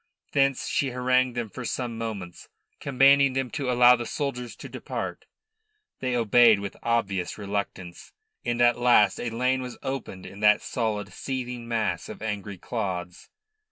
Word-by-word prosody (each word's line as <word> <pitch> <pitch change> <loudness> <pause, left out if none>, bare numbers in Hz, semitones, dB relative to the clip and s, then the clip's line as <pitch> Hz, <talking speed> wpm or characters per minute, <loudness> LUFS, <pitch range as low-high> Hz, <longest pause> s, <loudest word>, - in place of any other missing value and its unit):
Thence 135 -1 +2
she 140 - 0
harangued 125 0 +1
them 115 -3 -3
for 130 - -7
some 120 -1 -3
moments, 105 -6 -6 0.3
commanding 140 0 +4
them 130 -1 -2
to 140 -4 -3
allow 125 0 +7
the 120 -1 -5
soldiers 125 -5 -4
to - - -9
depart. - - -6 0.7
They 130 -1 -1
obeyed 115 -1 +5
with 100 0 -6
obvious 100 -6 -1
reluctance, 100 -3 -5 0.3
and 120 0 -1
at 120 0 +4
last 120 -5 +4
a 120 - -2
lane 125 +3 0
was 125 -1 -7
opened 125 -8 -5
in 100 - -10
that 105 0 +4
solid, 105 -5 -2
seething 125 -2 -5
mass 110 -7 -1
of - - -8
angry 105 -2 -4
clods. 90 -4 -5
120 Hz, 155 wpm, -26 LUFS, 105-125 Hz, 0.7 s, allow